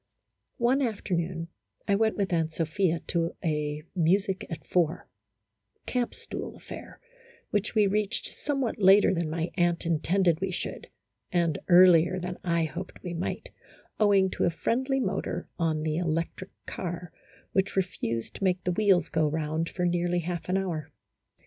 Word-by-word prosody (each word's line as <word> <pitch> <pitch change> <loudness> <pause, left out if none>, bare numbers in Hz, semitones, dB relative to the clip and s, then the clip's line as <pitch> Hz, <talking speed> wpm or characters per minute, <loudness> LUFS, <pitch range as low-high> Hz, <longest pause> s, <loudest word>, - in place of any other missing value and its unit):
One 255 +3 +3
afternoon, 175 -7 -2 0.4
I 200 - +3
went 220 +2 +2
with 195 -3 0
Aunt 165 -1 +1
Sophia 165 +1 0
to 165 -1 0
a 150 -1 -1
"music 190 +3 +1
at 165 -3 -6
four," 170 -2 0 0.4
" - - -49
camp 245 -1 0
stool" - - -6
affair - - -10 0.5
which 210 +1 -1
we 210 -1 +5
reached 210 +2 -1
somewhat 275 -7 -2
later 195 +1 +7
than 170 -3 -1
my 165 +2 -2
aunt 175 -1 +2
intended 170 +1 +2
we 195 - 0
should, 185 - -4 0.4
and 170 -4 +1
earlier 180 0 +7
than 180 0 -5
I 170 -2 +1
hoped 170 +4 -6
we 175 -2 -4
might, 170 +1 -3 0.5
owing 200 -3 +4
to - - 0
a - - +4
friendly 260 +10 0
motor - - -2
on 160 -2 +1
the 155 0 -1
electric 170 +2 -2 0.2
car 175 -1 -5 0.4
which 190 0 +1
refused 170 -12 -2
to - - -6
make 185 -1 +1
the 180 - 0
wheels 195 -1 +3
go 160 -1 +1
round 160 +2 -1
for 180 - -2
nearly 175 0 +1
half 175 +1 -4
an 185 - +2
hour. 165 -6 -3
175 Hz, 155 wpm, -28 LUFS, 165-195 Hz, 0.5 s, later